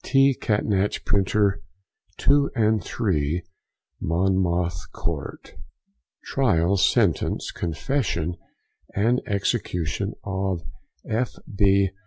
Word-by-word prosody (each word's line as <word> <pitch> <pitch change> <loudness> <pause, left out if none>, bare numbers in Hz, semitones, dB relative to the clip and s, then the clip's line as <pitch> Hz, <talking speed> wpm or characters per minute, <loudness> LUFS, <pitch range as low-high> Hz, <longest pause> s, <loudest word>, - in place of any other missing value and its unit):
T. 135 0 +4
Catnach, 105 -4 0
Printer, 100 0 +2 0.6
2 140 0 +3
and 110 -4 +2
3, 85 - -1 0.6
Monmouth 85 -1 0
Court. - - -5 0.7
TRIAL, 100 -8 +2
SENTENCE, 95 - +2
CONFESSION, 85 - -1 0.6
& - - -9
EXECUTION 100 -4 0
OF 95 -3 -2 0.4
F. 120 +3 -1 0.2
B. 100 -1 +4
100 Hz, 80 wpm, -24 LUFS, 90-110 Hz, 0.7 s, T